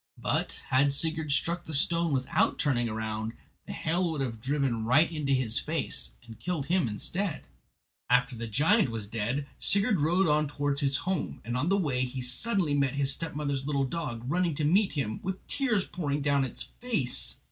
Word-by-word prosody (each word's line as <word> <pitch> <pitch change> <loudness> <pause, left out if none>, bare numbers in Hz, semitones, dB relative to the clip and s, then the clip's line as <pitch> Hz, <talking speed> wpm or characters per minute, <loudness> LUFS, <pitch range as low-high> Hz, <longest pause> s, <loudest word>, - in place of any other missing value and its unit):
But - - -1
had 135 +2 +4
Sigurd 160 0 -1
struck 170 +5 0
the 160 - -3
stone 170 +3 +2
without 130 -2 +1
turning 120 -5 +1
round, 110 0 -3 0.3
the - - -5
hail 170 +2 0
would 155 -3 -2
have 115 -4 -3
driven 135 -4 0
right 145 +9 +4
into 150 -4 -2
his 130 -4 +2
face - - -2
and 115 -1 -12
killed 170 -5 -2
him 175 -2 +2
instead. 170 - -2 0.7
After 125 +1 +3
the 115 0 -5
giant 160 - +3
was 115 -2 -3
dead 115 +6 -2
Sigurd 200 -2 +4
rode 175 +5 +3
on 150 0 +3
towards 145 0 -1
his 135 -1 +3
own - - -10
home, 185 -2 -2
and 120 +1 -3
on 130 +7 0
the 195 - +3
way 135 -9 +1
he 130 +1 -4
suddenly 150 - 0
met 140 -1 +1
his 140 -1 +2
stepmother's 145 -4 -3
little 140 -2 +1
dog, 130 -5 -4
running 170 +1 +1
to 150 - -1
meet 190 +3 +3
him, 120 -8 -2
with 190 +1 -5
tears 240 -9 +1
pouring 145 -5 -2
down 140 -1 +3
its 125 - -6 0.2
face. 140 - -2
145 Hz, 190 wpm, -29 LUFS, 125-170 Hz, 0.7 s, had